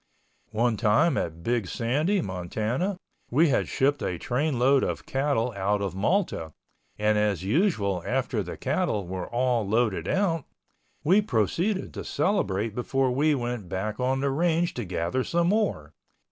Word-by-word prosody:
One 115 0 +1
time 110 +12 +3
at 85 0 -3
Big 120 -5 0
Sandy, 150 - 0
Montana, 110 - -2 0.3
we 155 +6 +4
had - - +1
shipped 140 +2 +1
a 90 - -2
train 135 - -1
load 135 +2 +4
of - - -3
cattle 135 -3 0
out 100 +1 0
of 100 -2 -2
Malta, 95 - 0 0.4
and 105 0 +2
as 105 -4 0
usual 105 - +1
after - - -1
the - - -6
cattle 100 -3 -1
were 90 0 -5
all 120 -1 +1
loaded 105 -4 0
out, 170 -7 +1 0.6
we 185 +7 +5
proceeded 180 - 0
to - - -5
celebrate 110 - 0
before 130 +2 0
we 145 +4 +2
went 120 -7 -4
back 100 +3 -3
on 130 +1 +1
the 140 0 +1
range 170 +3 +1
to 120 - -4
gather 90 +8 -1
some 170 +4 +1
more. 190 - 0
120 Hz, 155 wpm, -26 LUFS, 100-155 Hz, 0.6 s, we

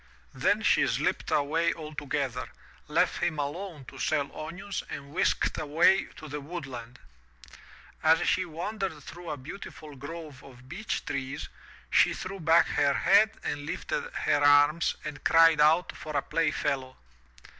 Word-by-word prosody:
Then - - +1
she - - +4
slipped - - -1
away 165 +4 +1
altogether, 145 -4 -4 0.4
left - - +1
him 175 -3 0
alone 150 +1 -4
to - - -12
sell 140 -1 -1
onions 185 +5 -5
and 140 0 -7
whisked 185 - +1
away 165 +6 +3
to 155 - -10
the 150 0 -5
woodland. 135 -7 -7 1.0
As 160 +2 +4
she 185 - +2
wandered 175 -1 -4
through 175 +3 -9
a 150 - -3
beautiful 150 0 -9
grove 145 0 -9
of 130 -1 -15
beech 195 +9 -4
trees, 135 0 -4 0.4
she - - +4
threw 195 +1 -6
back 165 0 +5
her 140 -1 +2
head 215 +3 +4
and 145 0 -4
lifted 485 - -3
her 145 - +1
arms 145 +3 +5
and 150 -1 -6
cried 165 -2 +6
out 160 +3 +4
for 155 -2 -4
a 140 - 0
play 165 -2 +1
fellow. 135 -3 -2
155 Hz, 145 wpm, -28 LUFS, 145-170 Hz, 1.0 s, cried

